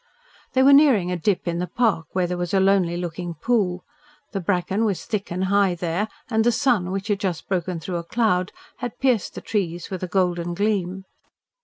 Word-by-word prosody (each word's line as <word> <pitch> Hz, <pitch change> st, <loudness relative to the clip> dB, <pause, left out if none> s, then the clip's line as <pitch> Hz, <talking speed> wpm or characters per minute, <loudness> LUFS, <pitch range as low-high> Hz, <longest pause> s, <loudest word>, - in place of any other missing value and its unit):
They 260 Hz, -, +4 dB
were 280 Hz, +1 st, +7 dB
nearing 260 Hz, -11 st, +5 dB
a -, -, 0 dB
dip 180 Hz, +2 st, 0 dB
in 170 Hz, 0 st, -1 dB
the 180 Hz, -, -2 dB
park, 215 Hz, -10 st, +1 dB
where 185 Hz, -1 st, +1 dB
there 180 Hz, +1 st, -2 dB
was 175 Hz, +1 st, -2 dB
a -, -, +5 dB
lonely 190 Hz, -3 st, +3 dB
looking 175 Hz, 0 st, -4 dB
pool. 185 Hz, -1 st, 0 dB, 0.5 s
The 195 Hz, -, -2 dB
bracken 190 Hz, +3 st, 0 dB
was 205 Hz, -5 st, -1 dB
thick 205 Hz, -2 st, -3 dB
and 180 Hz, +2 st, -1 dB
high 195 Hz, -1 st, +2 dB
there, 175 Hz, +4 st, -1 dB, 0.2 s
and 220 Hz, -2 st, +1 dB
the 240 Hz, -, +4 dB
sun, 230 Hz, -7 st, +1 dB
which 195 Hz, +2 st, -4 dB
had 205 Hz, -1 st, +1 dB
just 185 Hz, -6 st, -3 dB
broken 180 Hz, -2 st, -1 dB
through 175 Hz, +2 st, -4 dB
a 170 Hz, -, -4 dB
cloud, 185 Hz, -2 st, +1 dB, 0.3 s
had 245 Hz, -3 st, -5 dB
pierced 250 Hz, -7 st, +1 dB
the -, -, -6 dB
trees 175 Hz, -5 st, -3 dB
with 185 Hz, -, -4 dB
a 185 Hz, -, -2 dB
golden 175 Hz, -2 st, 0 dB
gleam. 195 Hz, -2 st, -1 dB
190 Hz, 205 wpm, -23 LUFS, 175-210 Hz, 0.5 s, were